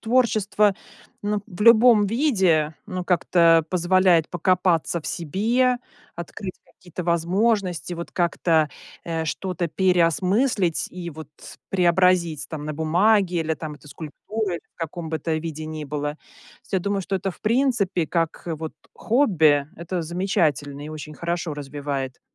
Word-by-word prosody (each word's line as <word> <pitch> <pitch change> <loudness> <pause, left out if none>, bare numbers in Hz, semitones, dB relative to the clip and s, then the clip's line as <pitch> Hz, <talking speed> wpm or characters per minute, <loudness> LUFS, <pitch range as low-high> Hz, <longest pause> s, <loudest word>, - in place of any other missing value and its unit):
творчество, 215 -4 +2 0.5
м, 205 0 -1
в 185 -4 -12
любом 230 -1 +7
виде, 190 - +2
ну, 185 -3 -4
как-то 170 -2 +4
позволяет 180 -2 +3
покопаться 175 -2 +1
в 150 - -10
себе, 225 - +1 0.4
открыть 180 +2 -6
какие-то 180 0 -9
возможности, 180 +1 0
вот 170 0 -7
как-то, 165 -3 +1 0.4
э, 165 -1 -2
что-то 180 +2 -3
переосмыслить 185 - +2
и 180 -1 -7
вот 155 -2 -10 0.4
преобразить 175 -4 +2
там 150 -2 -6
на 155 - -4
бумаге 180 +4 +2
или 160 0 -1
там 155 -1 -7
скульптуре, 170 - -5 0.2
в - - -66
каком 165 0 -5
бы 160 - -2
то 160 +3 -3
виде 155 -1 -4
ни 155 -1 -6
было. 145 +1 -4 0.5
Я 190 - +2
думаю, 200 +2 -1
что 195 +1 -4
это, 195 +1 -3
в 175 - -15
принципе, 215 - +1
как, 165 -1 -1
э, 165 - -2
вот 160 0 -6 0.2
хобби, 160 - +3
это 170 +1 -4
замечательно 155 -5 -1
и - - -7
очень 155 0 -8
хорошо 170 -1 -3
развивает. 140 -2 -5
175 Hz, 135 wpm, -23 LUFS, 155-195 Hz, 0.5 s, любом